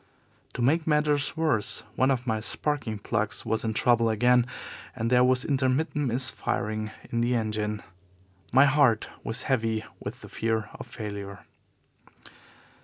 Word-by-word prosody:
To 120 - -2
make 155 +6 +2
matters 150 -1 +1
worse, 150 -13 0
one 130 - +3
of 125 -2 0
my 110 -3 0
sparking 120 0 -2
plugs 105 +1 -2
was 110 0 -1
in 110 -1 -2
trouble 115 -1 +3
again 125 +2 +3 0.5
and 115 +2 -2
there 125 0 +5
was 130 0 +3
intermittent 140 +2 0
misfiring 110 -3 -1 0.2
in 115 - 0
the 120 +1 +1
engine. 105 -2 -2 0.7
My 135 +3 +7
heart 140 -6 +3
was 115 - -2
heavy 115 -4 0
with - - -7
the - - -10
fear 110 -1 -2
of - - -9
failure. 100 -2 -7
120 Hz, 140 wpm, -27 LUFS, 110-130 Hz, 0.7 s, My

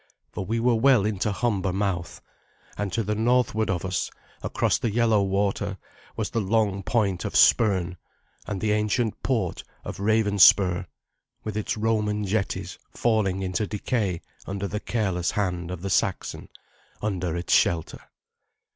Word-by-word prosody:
For - - -4
we 115 +5 -1
were 120 +1 +3
well 115 -2 +4
into 105 0 0
Humber 100 -2 0
mouth, 95 -3 -2 0.5
and 105 -2 -3
to 115 - 0
the 105 +1 -1
northward 110 -1 +1
of 90 -1 -1
us, 95 -1 -1 0.3
across - - 0
the 120 - 0
yellow 115 -1 +3
water, 100 0 -1 0.4
was - - -3
the 115 - 0
long 100 -1 +1
point 100 -3 0
of - - -4
Spurn, 95 -5 +4 0.5
and 100 -2 -3
the 105 +2 0
ancient 105 +2 0
port 110 -10 -1 0.2
of - - -6
Ravenspur, 100 -3 +4 0.6
with 110 -2 -4
its 110 0 -2
Roman 105 -1 0
jetties 100 0 -2
falling 100 -5 0
into 95 +3 -1
decay 105 -4 -1 0.3
under 100 +1 -3
the 105 - -3
careless 95 -7 -1
hand 90 -4 -2
of 90 -1 -6
the 100 - -2
Saxon, - - -1 0.5
under 90 -5 -1
its 85 - -1
shelter. 80 -2 +2
100 Hz, 145 wpm, -25 LUFS, 95-110 Hz, 0.6 s, well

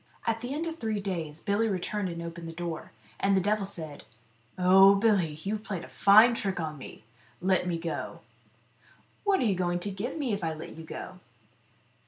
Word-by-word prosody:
At 225 0 0
the 245 +2 -5
end 305 +4 -2
of 330 -1 -4
three 220 -5 -2
days 165 -6 -4
Billy 210 +2 +1
returned 200 0 -2
and 170 -1 -5
opened 170 0 -7
the - - -5
door, 170 -1 -5 0.3
and 195 0 +3
the - - +5
devil 205 +1 0
said, 160 -7 -4 0.3
" 115 0 -36
Oh, 190 +2 +7
Billy, 195 -8 +2
you've 210 +2 -2
played 195 -5 -4
a - - -9
fine 215 +4 +6
trick 195 -5 -2
to 160 -3 -3
me; 135 -6 -11 0.4
let 185 0 +1
me 170 -2 0
go." 165 0 -5 0.5
" - - -32
What 400 -2 +3
are - - +2
you 210 - +3
going 175 -1 0
to 205 - -2
give 210 +10 -4
me 270 -8 -1
if 200 -2 -3
I 160 -1 -1
let 155 - -9
you 165 - -9
go 185 +3 -8
190 Hz, 210 wpm, -29 LUFS, 170-215 Hz, 0.5 s, Oh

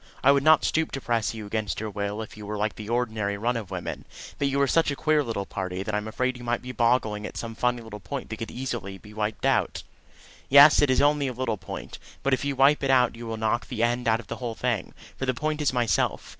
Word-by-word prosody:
I 140 - +7
would 140 0 +3
not 155 +1 +5
stoop 160 0 +1
to 135 - -2
press 115 -2 -1
you 110 -1 -6
against 105 -4 -2
your 110 0 -4
will 100 +2 -3
if 110 - -11
you 105 - -10
were 105 0 -3
like 105 0 0
the 105 0 -8
ordinary 110 -4 -1
run 120 +4 0
of 110 -5 -4
women; - - -5 0.3
but 140 - +2
you 140 0 0
are 140 - +4
such 165 +3 +3
a 140 - -1
queer 155 +1 +2
little 110 -6 -3
party, 95 -1 -4
that 105 - -4
I'm 105 +1 -1
afraid 130 +3 -1
you - - -9
might 120 0 -1
be 125 - -5
boggling 115 -3 +1
at - - -9
some 115 -1 -5
funny 120 +1 0
little 110 -2 -9
point 135 +3 -6
that 110 - -4
could 115 - -5
easily 120 -7 -5
be 105 +2 -14
wiped 105 +3 -2
out." 135 -4 +1 0.7
"Yes; 140 +2 +8
it 145 - +3
is 130 +2 +3
only 145 -1 +3
a 130 - -3
little 120 -2 -1
point. 90 -3 -8 0.2
But 135 - +2
if 130 - +1
you 140 -1 -1
wipe 135 +3 +4
it 135 - 0
out 125 -3 +4
you 115 0 -8
will 110 0 -4
knock 110 +2 0
the 115 -3 -2
end 120 +1 0
out 115 0 +3
of 120 - -9
the 115 - -6
whole 120 -3 -4
thing 120 -6 -2 0.2
for 135 - -3
the 130 - +1
point 155 +3 -2
is 150 - +2
myself. 120 -4 0
120 Hz, 265 wpm, -26 LUFS, 110-135 Hz, 0.7 s, Yes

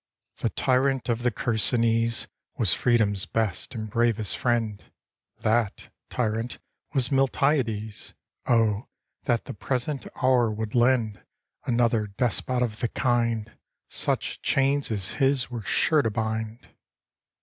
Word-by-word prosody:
The - - 0
tyrant 130 0 +1
of 120 0 0
the 125 - +2
Chersonese 115 0 +2 0.3
Was - - +4
freedom's 110 -5 +2
best 110 +1 -2
and 110 -1 -4
bravest 115 -1 +1
friend; 115 -4 0 0.6
That 110 -2 0 0.2
tyrant 115 0 -2 0.4
was 130 -2 +2
Miltiades! 130 -6 0 0.3
Oh! 115 -1 +2 0.4
that 120 -2 +1
the - - -6
present 130 +5 -3 0.2
hour 125 -3 +4
would 110 0 -4
lend 120 -4 +2 0.4
Another 115 -3 +2
despot 125 +4 0
of 110 -3 -3
the 120 - +1
kind! 115 -3 0 0.4
Such - - -1
chains 140 +1 +1
as 100 -4 -2
his 135 -2 +2
were 120 -2 -4
sure 155 +8 +3
to 115 - 0
bind. 110 +1 -3
115 Hz, 120 wpm, -26 LUFS, 110-125 Hz, 0.6 s, Was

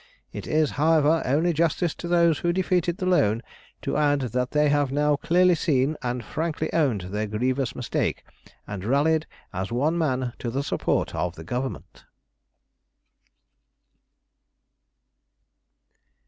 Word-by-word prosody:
It - - -6
is, 155 -1 +2
however, 160 0 +4
only 155 +7 +2
justice 165 +1 +1
to 175 - -7
those 170 -2 +3
who 175 - +1
defeated 180 -1 0
the 185 - -3
loan 115 - +2 0.4
to - - -1
add 145 -2 +2
that 125 0 -1
they 150 0 +2
have 145 -2 +1
now 150 +1 +2
clearly 180 +5 +3
seen 150 -2 +1
and 125 -1 -3
frankly 160 -1 -3
owned 135 - +2
their 105 +4 -3
grievous 125 +4 -1
mistake, 120 - -2 0.4
and 100 -3 -6
rallied 150 +7 +2 0.3
as 95 +3 -4
one 150 +8 +1
man 130 -6 0
to 120 - -3
the 135 +4 -2
support - - -1
of 90 0 -2
the 80 - -9
Government." 125 +9 -5
145 Hz, 135 wpm, -25 LUFS, 125-165 Hz, 0.4 s, however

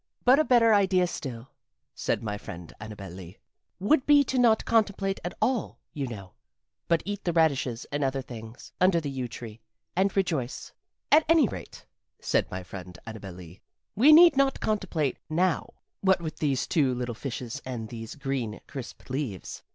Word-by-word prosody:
"But 255 +4 +7
a - - +5
better 235 -5 +5
idea 190 -3 +4
still," 130 -7 -6 0.4
said - - -2
my 105 -2 -2
friend 85 -5 -9
Annabel 105 -3 -8
Lee, 90 +1 -10 0.4
"would 255 +9 +2
be 290 -1 +7
to 260 -1 -1
not 230 -3 +4
contemplate 200 -3 +1
at 175 - -4
all, 250 -3 0 0.2
you 140 -4 -3
know, 100 -6 -8 0.5
but 170 -1 +2
eat 205 0 -4
the 175 - 0
radishes 140 -8 +1
and 145 0 -1
other 135 0 -1
things, 115 -1 -10
under 185 -2 +5
the 145 -3 -4
yew 130 -2 -3
tree, 115 -2 -9 0.3
and 195 +2 +1
rejoice. 155 -9 -1 0.4
"At 310 +2 +7
any 325 -6 +6
rate," - - -9 0.3
said - - 0
my 95 0 -5
friend 90 -1 -9
Annabel 110 -5 -8
Lee, 90 +1 -12 0.3
"we 265 +9 +7
need 335 0 +9
not 275 0 +2
contemplate 180 - -1
now 170 0 +1 0.3
what 190 -1 +3
with 160 -2 -6
these 140 -3 +1
two 135 -6 +2
little 120 -1 -3
fishes 120 -1 -5
and 120 -4 -5
these 115 -1 -7
green, 135 -7 -3
crisp 130 -4 -9
leaves." 130 - -4
140 Hz, 170 wpm, -27 LUFS, -, 0.5 s, need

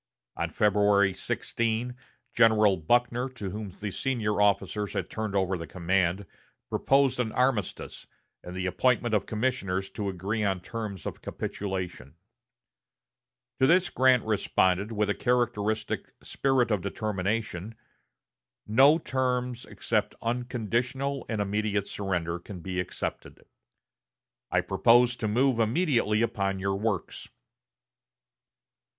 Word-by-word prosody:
On - - -2
February 100 -2 +3
16, 115 +5 -2 0.4
General 110 -3 +5
Buckner, 120 +9 +1
to 105 -7 -6
whom 105 +1 -5
the 105 -1 -3
senior 110 -4 -1
officers 105 0 +1
had - - -3
turned 110 -2 -3
over 95 -1 +1
the 85 - -6
command, 95 +1 0 0.5
proposed 135 -2 +2
an 115 -3 0
armistice, 125 -6 -1 0.4
and 90 - -8
the 95 0 -3
appointment 120 +5 +1
of 105 - +1
commissioners 105 -5 -1
to 100 -2 -3
agree 100 +4 -2
on 95 -2 0
terms 105 -1 -6
of - - -5
capitulation. 90 -8 -5 1.4
To 130 - +5
this 180 +3 +4
Grant 130 -1 +4
responded 100 -1 +1
with 105 -1 0
a - - +1
characteristic 110 -3 -1
spirit 135 -3 +1
of 105 -3 +1
determination: 105 0 -3 0.9
"No 135 +8 +6
terms 125 -4 -2
except - - -2
unconditional 125 +3 -2
and 110 -2 -2
immediate 105 0 0
surrender 85 -5 -2
can 90 0 -9
be 90 +1 -3
accepted. 90 - -5 1.0
I - - +2
propose 120 +1 +4
to 110 - -2
move 125 +3 +2
immediately 115 - +2
upon 100 -4 -1
your 95 +1 -1
works." 100 -2 -3
105 Hz, 120 wpm, -28 LUFS, 95-120 Hz, 1.4 s, No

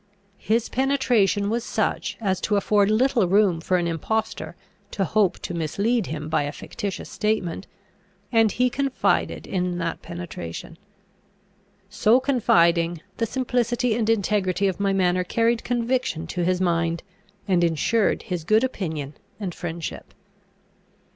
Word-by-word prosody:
His 225 +1 +1
penetration 245 -7 +2
was 230 +2 -1
such, - - -1
as 190 -4 -1
to 210 - +1
afford 200 0 +3
little 230 -2 +3
room 190 -3 +3
for 185 +2 +1
an 175 - 0
impostor 220 +7 -2 0.3
to 195 - -1
hope 205 +1 +2
to - - -4
mislead 200 +7 0
him 150 0 -5
by 155 - +1
a 145 0 -2
fictitious 200 +4 -6
statement, 205 -4 -2 0.6
and 225 -3 +4
he 250 +1 +2
confided 270 +1 0
in 180 -2 -2
that 165 -1 -3
penetration. 170 - -7 1.1
So 230 +4 +3
confiding, 170 - +2 0.2
the 230 - 0
simplicity 245 -1 0
and 225 -1 0
integrity 200 -3 +1
of 190 - -2
my 200 -1 +1
manner 180 -1 +2
carried 230 +5 +1
conviction 240 -8 -1
to 175 - -1
his 180 +1 +1
mind, 170 -2 0 0.4
and 180 -3 +3
insured 170 +7 +1
his 180 -6 -4
good 215 +7 +3
opinion 160 - -3 0.3
and 190 -4 -4
friendship. 170 -1 -6
200 Hz, 135 wpm, -24 LUFS, 175-230 Hz, 1.1 s, and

